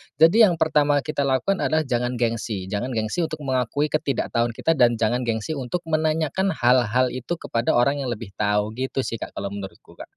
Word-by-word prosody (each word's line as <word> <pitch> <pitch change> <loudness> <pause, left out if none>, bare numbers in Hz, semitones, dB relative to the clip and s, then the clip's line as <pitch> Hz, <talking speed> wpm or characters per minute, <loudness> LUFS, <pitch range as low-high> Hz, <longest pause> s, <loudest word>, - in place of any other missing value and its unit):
Jadi, 170 +9 +6
yang 175 - +1
pertama 150 -3 +2
kita 155 -1 -2
lakukan 135 +9 +1
adalah, 155 0 +1
jangan 125 -1 -1
gengsi. 115 -4 -2
Jangan 110 +5 -2
gengsi 110 +10 -1
untuk 155 -2 -4
mengakui 130 +2 0
ketidaktahuan 120 -6 -1
kita 165 - +1
dan 120 -5 +3
jangan 120 +3 +1
gengsi 110 +5 -2
untuk 140 +6 -4
menanyakan 160 +4 0
hal-hal 125 0 +3
itu 130 +7 -4
kepada 115 -6 -1
orang 140 +4 +2
yang 130 - -3
lebih 110 -3 -9
tahu. 105 0 +1
Gitu, 130 +2 -2
sih, 115 - -4
Kak, - - -7
kalau 100 0 -4
menurutku, 100 -1 -9
Kak. - - -8
130 Hz, 190 wpm, -23 LUFS, 115-155 Hz, -, Jadi